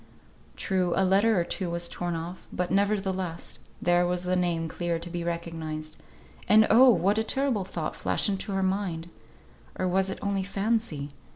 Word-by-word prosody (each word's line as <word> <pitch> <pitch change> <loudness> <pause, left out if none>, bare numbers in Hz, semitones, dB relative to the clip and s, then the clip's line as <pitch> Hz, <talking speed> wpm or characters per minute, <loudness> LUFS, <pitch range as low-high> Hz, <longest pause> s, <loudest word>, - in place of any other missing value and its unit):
True, 185 -3 0
a 190 - +3
letter 200 +2 +4
or - - +2
two 180 +1 -3
was 170 0 -1
torn 175 0 -3
off, 170 +3 -7
but, 180 0 -2
nevertheless, 190 -3 -1 0.2
there 175 0 +3
was 180 0 -1
the 180 0 0
name 170 -2 0
clear 170 +1 -2
to 170 +1 -7
be 175 -1 -3
recognised. 165 -2 -4 0.5
And 215 +2 +7
oh! 255 +4 +8
what 200 -1 +3
terrible 265 -8 +1
thought 165 -4 -4
flashed - - +1
into 200 0 -2
her 195 0 0
mind; 185 -3 -2 0.7
or 185 - 0
was 190 +1 +1
it - - -4
only 200 -1 0
fancy? 195 -7 -1
180 Hz, 170 wpm, -27 LUFS, 170-195 Hz, 0.7 s, oh